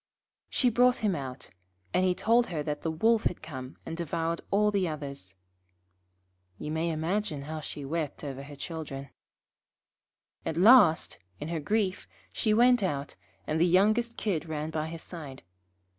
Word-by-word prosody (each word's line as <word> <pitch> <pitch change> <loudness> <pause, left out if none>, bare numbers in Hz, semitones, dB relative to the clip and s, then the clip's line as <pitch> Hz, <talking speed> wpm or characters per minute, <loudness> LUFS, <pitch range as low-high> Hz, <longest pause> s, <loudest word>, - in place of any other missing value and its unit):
She 250 -3 +2
brought 245 +2 +5
him 195 -4 +2
out, 135 -3 -7 0.4
and 185 - +3
he 185 -1 +2
told 235 +4 +3
her 155 -4 -3
that 150 0 -3
the 165 - -1
Wolf 220 +8 +2
had 175 - -1
come 130 -4 -8
and - - -5
devoured 165 0 -2
all 210 +1 +3
the 195 -3 +1
others. 140 - -6 1.2
You 150 - -5
may 160 +2 0
imagine 160 -1 -1
how 155 +2 -5
she 145 -1 -6
wept 155 0 -3
over 135 -2 -5
her 145 +1 -10
children. 140 -3 -6 1.3
At 160 - -3
last, 195 -4 +6 0.2
in 150 - -5
her 165 -1 -1
grief, 195 +4 -1 0.3
she 215 - +1
went 245 +2 +5
out, 145 -7 -2 0.3
and 155 +1 0
the 175 - +5
youngest 215 +6 +3
Kid 170 -6 -1
ran 155 0 -3
by 155 0 -2
her 165 - -6
side. 155 -5 -8
165 Hz, 160 wpm, -29 LUFS, 150-200 Hz, 1.3 s, last